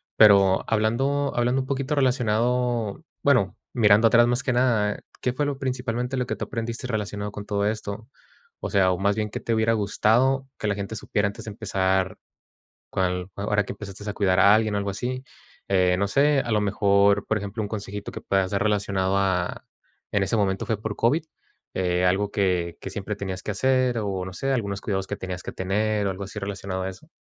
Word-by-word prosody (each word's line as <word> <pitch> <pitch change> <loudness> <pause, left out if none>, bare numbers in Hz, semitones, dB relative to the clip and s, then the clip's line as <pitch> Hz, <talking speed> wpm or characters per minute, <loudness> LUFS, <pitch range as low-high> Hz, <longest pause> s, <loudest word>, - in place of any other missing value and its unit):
Pero 100 -3 +6
hablando 135 +6 +1
hablando 120 +2 +2
un 130 - -6
poquito 135 +1 -1
relacionado 125 -2 +1 0.2
bueno, 125 -9 +2 0.2
mirando 110 -1 +5
atrás 120 +1 +5
más 120 +1 0
que 130 - 0
nada, 115 -5 +2 0.2
¿qué 125 - 0
fue 145 +3 0
lo 140 -1 -3
principalmente 125 -1 -2
lo 125 -1 0
que - - -3
tú - - -3
aprendiste 115 +1 -4
relacionado 105 -2 -3
con 105 - -7
todo 100 -1 0
esto? 110 0 -4 0.5
O - - -5
sea, 95 -2 +4
o 90 - 0
más 100 +2 +1
bien, 105 -1 -2
¿qué - - -5
te 115 - -2
hubiera 110 +1 +2
gustado 120 +6 +2
que - - -5
la 100 - +2
gente 100 +2 -5
supiera 105 -1 0
antes 100 - -7
de 110 - -5
empezar 95 -2 0 0.7
cuál 90 0 -1
ahora 105 +1 0
que 100 - -6
empezaste 105 0 -8
a - - -3
cuidar 95 -3 +2
a 100 +3 +7
alguien, 110 -1 +1
algo 100 0 -1
así. 125 +6 -3 0.4
Eh, 90 -2 +3
no 100 - +1
sé, 145 +5 +3
a 120 - -3
lo 105 - +3
mejor, 100 0 +3
por 110 - +1
ejemplo, 100 +2 -4
un 105 - -2
consejito 105 -1 -5
que - - -7
puedas 95 -1 +1
dar 100 0 0
relacionado 100 -2 +1
a 90 -2 0 0.5
en 100 -1 +2
ese 100 +4 0
momento 95 -2 0
fue 110 -2 -2
por 110 -2 -3
COVID, 145 +8 +2 0.5
eh, 90 -1 +1
algo 100 +3 +1
que, 90 -4 0
que - - -5
siempre 100 +2 -4
tenías 95 -2 -5
que - - -2
hacer, 130 +2 +2
o, 95 -3 -2
no 95 - -7
sé, 135 +8 -2
algunos 100 -6 -1
cuidados 95 -2 -2
que - - -4
tenías 90 -1 -5
que - - -5
tener, 105 +2 0
o - - +1
algo 95 +1 -6
así 100 +2 -6
relacionado 100 -2 -4
a 95 - -2
eso. 125 - -13
105 Hz, 205 wpm, -25 LUFS, 100-120 Hz, 0.7 s, a